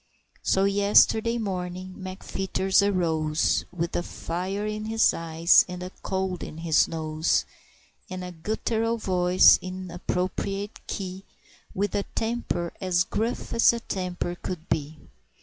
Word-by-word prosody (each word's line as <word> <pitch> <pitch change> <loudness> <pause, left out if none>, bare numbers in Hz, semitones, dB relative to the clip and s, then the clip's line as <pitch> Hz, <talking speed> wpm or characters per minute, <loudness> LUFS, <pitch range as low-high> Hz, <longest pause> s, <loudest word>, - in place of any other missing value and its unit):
So, 190 - +2
yesterday 205 +3 +4
morning, 185 -3 -4
McFeeters 190 0 0
arose, 160 -6 +1
With 170 -1 -3
a - - +1
fire 185 +4 -4
in 215 0 -3
his 225 0 +3
eyes, 165 +1 +4
and 180 0 -6
a 180 - -6
cold 190 -1 -2
in 155 - -7
his 165 -1 +3
nose, 155 -1 0 0.6
And 185 0 -5
a 180 - -6
gutteral 220 +6 -1
voice 180 -3 +5
in 185 -1 -6
appropriate 190 +3 -3
key 190 -1 -5 0.5
With 205 +2 -1
a 200 - 0
temper 225 -7 -2
as 180 -2 +2
gruff 225 +5 -3
as 230 - +5
a 235 - -3
temper 180 -5 -3
could 175 -3 -5
be. 155 +1 -2
185 Hz, 130 wpm, -26 LUFS, 175-200 Hz, 0.6 s, voice